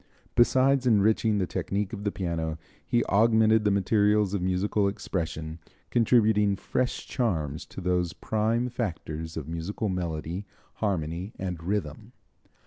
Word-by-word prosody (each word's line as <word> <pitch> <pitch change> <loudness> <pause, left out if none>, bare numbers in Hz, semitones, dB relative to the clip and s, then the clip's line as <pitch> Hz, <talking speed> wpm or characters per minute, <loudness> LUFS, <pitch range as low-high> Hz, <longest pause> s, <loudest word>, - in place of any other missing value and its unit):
Besides 130 +2 +4
enriching 110 0 +3
the 95 - +1
technique 100 +3 -2
of 105 -1 -6
the 100 - +1
piano, 80 -4 -3 0.3
he 120 - +1
augmented 110 +1 +4
the - - +5
materials 105 +1 +2
of 100 - -1
musical 95 +3 +1
expression, 80 -5 -4 0.3
contributing 110 -4 +3
fresh 125 +5 -2
charms 80 - -2
to - - -8
those 90 -1 0
prime 110 +4 0
factors 80 -9 -4
of 75 -3 -5
music 85 +4 -5
melody, 90 -2 -2 0.3
harmony 90 -1 -2
and 90 -3 -4
rhythm. 90 -5 -3
100 Hz, 130 wpm, -27 LUFS, 85-110 Hz, 0.3 s, the